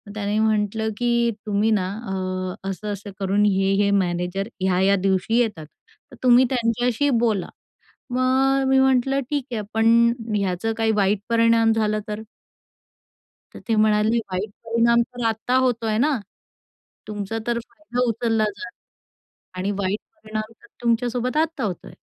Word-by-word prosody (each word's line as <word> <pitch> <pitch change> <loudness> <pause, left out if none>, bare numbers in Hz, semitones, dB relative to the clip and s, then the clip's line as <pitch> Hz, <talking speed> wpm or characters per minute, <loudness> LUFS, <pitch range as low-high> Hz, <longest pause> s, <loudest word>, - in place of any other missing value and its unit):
त्यांनी 205 0 -1
म्हटलं 220 0 +1
की 235 -1 +2
"तुम्ही 210 +1 +1
ना 190 -4 +1 0.2
अ, 185 0 -4
असं-असं 205 +1 -5
करून 200 +2 +2
हे-हे 195 0 +2
मॅनेजर 180 +3 -1
या-या 190 +1 +3
दिवशी 195 +4 +1
येतात, 210 -10 -1 0.5
तर - - -12
तुम्ही 250 +1 +6
त्यांच्याशी 245 +2 +1 0.2
बोला." 210 -5 0 0.6
मग 260 +2 +2
अ, - - -1
मी 265 0 +5
म्हटलं 265 +1 +3
"ठीक 285 -3 -1
आहे, 215 - -1
पण 230 +1 +4 0.2
ह्याचं 200 +3 -1
काही 225 0 +2
वाईट 195 +1 +2
परिणाम 230 -1 +4
झाला 215 -1 +1
तर?" 210 +1 -4 1.3
तर - - -10
ते 225 - +2
म्हणाले, 215 +1 +3
"वाईट 190 +4 -2 0.2
परिणाम 235 +1 +3
तर 245 0 -5
आत्ता 225 +3 -1
होतोय 230 -4 +1
ना? 285 +3 +2 0.9
तुमचा 210 +1 -4
तर 235 0 0
फायदा 250 0 -5
उचलला 225 -1 0
जात 415 - -6 0.6
आहे 185 - -14
आणि 200 +2 -1
वाईट 200 +2 -1 0.2
परिणाम 215 -5 -6 0.3
तुमच्यासोबत 245 +3 0
आत्ता 325 -3 0
होतोय." 185 -5 -5
220 Hz, 140 wpm, -23 LUFS, 200-240 Hz, 1.3 s, तुम्ही